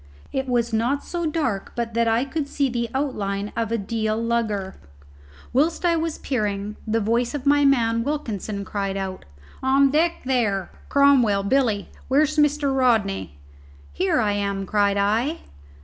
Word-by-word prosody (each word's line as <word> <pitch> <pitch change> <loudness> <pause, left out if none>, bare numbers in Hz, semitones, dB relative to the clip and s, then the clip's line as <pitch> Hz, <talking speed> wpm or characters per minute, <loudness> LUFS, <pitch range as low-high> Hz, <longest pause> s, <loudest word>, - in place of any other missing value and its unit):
It 265 -1 -2
was 240 -1 0
not 240 +6 0
so 345 -2 -3
dark 295 -11 -2
but 235 -1 -3
that 230 0 +2
I 230 +3 +2
could 285 +1 -3
see 280 -2 0
the 235 -1 -2
outline 205 -7 -2
of 225 -1 -2
a 230 - +1
Deal 220 +1 -1
lugger. 225 -4 -1 0.8
Whilst 315 +7 +1
I 340 -1 +4
was 325 -1 -2
peering, 210 -4 -2
the 225 +1 +1
voice 235 +5 0
of 280 -1 -5
my 290 0 +4
man 230 -4 +3
Wilkinson 215 -8 -3
cried 195 -1 -3
out, 190 -1 -5 0.4
"On 270 +1 +4
deck, 330 +3 +1
there! 215 -8 0 0.2
Cromwell 255 -8 +4
Billy 220 -3 +1 0.2
where's 300 +3 +2
Mr. 295 -2 +2
Rodney?" 200 - +1 0.6
"Here 190 - +1
I 210 -3 +2
am!" 200 -1 -2
cried 200 0 +2
I. 225 +10 +1
235 Hz, 155 wpm, -23 LUFS, 205-275 Hz, 0.8 s, I